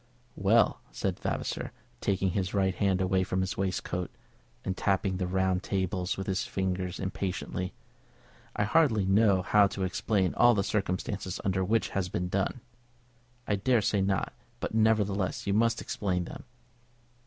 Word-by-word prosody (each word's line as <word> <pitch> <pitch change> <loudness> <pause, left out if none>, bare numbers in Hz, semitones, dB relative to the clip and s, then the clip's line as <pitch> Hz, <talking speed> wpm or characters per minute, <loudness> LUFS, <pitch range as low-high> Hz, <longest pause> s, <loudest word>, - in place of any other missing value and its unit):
"Well," 110 +4 +3
said - - -2
Vavasor, - - -3 0.3
taking 95 +2 0
his 95 +1 -2
right 95 -1 +2
hand 95 0 +1
away 95 0 +2
from 95 0 -1
his 95 0 -2
waistcoat, 90 -2 -2 0.6
and 95 - -1
tapping 95 -1 0
the 90 -1 -1
round 95 0 +1
table 95 -2 -2
with 95 - -3
his 95 -1 0
fingers 95 -2 -2
impatiently. 95 -1 -3 0.8
"I - - +1
hardly 110 -4 +3
know 95 -1 +4
how 105 +1 +5
to 95 0 -4
explain 95 0 0
all 120 -1 +5
the 100 - +1
circumstances 95 -1 -2
under 95 -1 +1
which 110 +4 +1
this - - -13
has 95 -2 -1
been 90 0 -2
done." 100 +6 -1 0.9
"I 105 - +2
dare 115 +2 +2
say 100 0 +2
not; 95 -1 0 0.3
but, - - -4
nevertheless, 105 -3 +1
you 100 - +1
must 115 +2 +2
explain 90 -3 -2
them." - - -9
95 Hz, 155 wpm, -29 LUFS, 95-105 Hz, 0.9 s, how